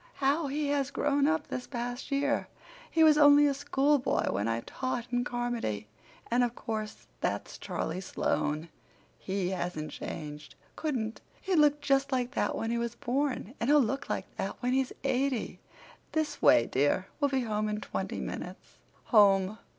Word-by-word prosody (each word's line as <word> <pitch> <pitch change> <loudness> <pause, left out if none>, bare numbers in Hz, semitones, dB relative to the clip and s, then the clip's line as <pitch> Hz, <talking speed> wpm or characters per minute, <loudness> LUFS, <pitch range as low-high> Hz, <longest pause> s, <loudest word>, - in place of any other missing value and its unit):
How 285 +3 +1
he 290 +1 -1
has 280 -2 +1
grown 285 0 +1
up 315 -1 +1
this 250 - -5
past 245 0 -4
year! 285 +1 +1 0.4
He 325 - +3
was 305 -1 +6
only 290 0 +8
a 285 - +3
schoolboy 280 0 +1
when 100 +2 -1
I 115 0 0
taught 255 - -3
in 245 0 +1
Carmody. 240 - -3 0.4
And 245 +1 +4
of 240 0 -1
course 215 -2 -5
that's - - -3
Charlie 185 - -3
Sloane. 155 -3 -1 0.5
He 190 -1 -2
hasn't 175 -4 -3
changed—couldn't! 220 - -5 0.2
He 380 - -2
looked 295 -2 +4
just 275 +1 +2
like 250 -1 0
that - - 0
when 225 - -2
he 235 - 0
was 235 0 -3
born, 260 -3 -1
and 235 - 0
he'll 295 0 +7
look 270 +1 -1
like - - -2
that - - -3
when 250 +1 +1
he's 265 -1 +1
eighty. 265 -2 0 0.5
This 315 -1 -1
way, 115 - +6
dear. 145 +7 +1
We'll 285 -2 +2
be 265 -1 +1
home 215 -2 -1
in 210 0 -2
twenty - - -4
minutes." - - -7 0.3
"Home!" 200 -1 +5
250 Hz, 165 wpm, -30 LUFS, 210-285 Hz, 0.5 s, only